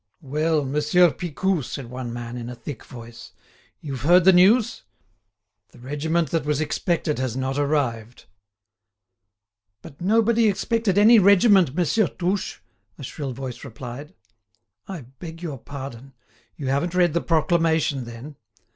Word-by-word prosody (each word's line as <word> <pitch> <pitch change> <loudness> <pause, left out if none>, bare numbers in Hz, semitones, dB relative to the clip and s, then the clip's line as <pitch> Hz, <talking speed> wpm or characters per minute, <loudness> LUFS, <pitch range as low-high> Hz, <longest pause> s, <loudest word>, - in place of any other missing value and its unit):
"Well! 150 +2 0
Monsieur 150 +5 +3
Picou," 180 +2 -2
said 125 -1 -7
one 125 -1 -5
man 120 0 -6
in 120 -1 -6
a 125 - -7
thick 120 0 -8
voice, 120 -2 -12 0.5
"you've 135 -5 -6
heard 175 +6 +5
the 190 +1 +7
news? 205 +6 +4 0.9
The - - -16
regiment 150 +6 -2
that 165 - 0
was 150 -1 -1
expected 155 0 -1
has 130 -2 -2
not 135 +1 -2
arrived." 125 -6 -2 1.6
"But 140 0 -13
nobody 225 +3 +3
expected 215 0 0
any 220 +3 +7
regiment, 195 - +5
Monsieur 180 +4 +2
Touche," 185 +2 -3 0.4
a - - -10
shrill 135 0 -5
voice 130 -1 -7
replied. 135 - -9 0.7
"I 190 -5 -6
beg 160 +7 -11
your 145 -6 -5
pardon. 135 -1 -9 0.4
You 135 -4 -4
haven't 160 +6 -1
read 175 -3 +3
the 170 - +1
proclamation, 160 -5 +1
then?" 120 +5 -10
150 Hz, 140 wpm, -23 LUFS, 130-180 Hz, 1.6 s, the